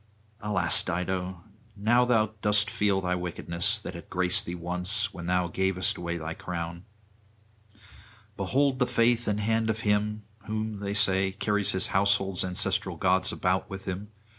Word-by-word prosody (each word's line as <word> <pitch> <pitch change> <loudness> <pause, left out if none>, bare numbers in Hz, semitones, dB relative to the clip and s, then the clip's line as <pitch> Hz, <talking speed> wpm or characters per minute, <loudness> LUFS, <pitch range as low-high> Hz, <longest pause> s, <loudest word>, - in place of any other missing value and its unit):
Alas, 105 -2 +2
Dido! 90 0 -3 0.3
now 120 +5 +3
thou 110 -3 +2
dost 105 0 +2
feel 100 -2 +1
thy 90 -1 -1
wickedness; 90 +3 +1
that 105 - -8
had 85 - -10
graced 90 0 +2
thee 85 - -4
once, 90 +4 -1
when 85 -1 -7
thou 90 0 +2
gavest 95 +1 0
away 85 0 -4
thy 80 0 -5
crown. 85 0 -6 1.5
Behold 130 +7 +1
the 125 - +2
faith 120 -1 +2
and 105 0 0
hand 110 +1 0
of 110 0 -1
him! 105 0 0 0.2
who, 110 0 -3
they 100 0 -4
say, 95 -2 +3
carries 105 0 0
his 95 0 +2
household's 95 -1 +2
ancestral 90 -1 -2
gods 95 +1 +2
about 90 0 -1
with 95 0 -7
him! 95 +2 -5
95 Hz, 155 wpm, -27 LUFS, 90-105 Hz, 1.5 s, now